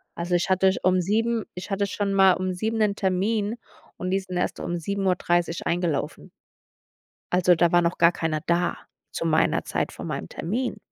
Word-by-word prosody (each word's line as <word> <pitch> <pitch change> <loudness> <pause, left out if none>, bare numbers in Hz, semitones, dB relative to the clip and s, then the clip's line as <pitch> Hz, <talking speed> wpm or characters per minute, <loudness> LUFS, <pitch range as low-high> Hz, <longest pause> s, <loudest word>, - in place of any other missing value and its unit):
Also 175 +1 -1
ich 175 +2 0
hatte 190 0 +4
um 185 0 +3
7 225 +4 0
ich 185 +3 -7
hatte 200 +1 0
schon 200 0 -2
mal 190 -1 +6
um 185 0 -2
7 220 +5 -2
'nen 205 -2 +2
Termin 205 +4 0 0.4
und 185 0 -3
die 195 - +2
sind 185 -2 -6
erst 180 - -1
um 175 - -3
7:30 175 -2 0
eingelaufen. 170 -5 -2 1.0
Also, 180 -1 +4
da 170 0 +3
war 175 0 +5
noch 170 +1 0
gar 170 +1 +5
keiner 160 -3 -2
da 175 0 +1 0.3
zu 165 - -4
meiner 160 -1 +2
Zeit - - -2
von - - -8
meinem 80 - -4
Termin. 235 +10 -3
185 Hz, 180 wpm, -25 LUFS, 175-200 Hz, 1.0 s, mal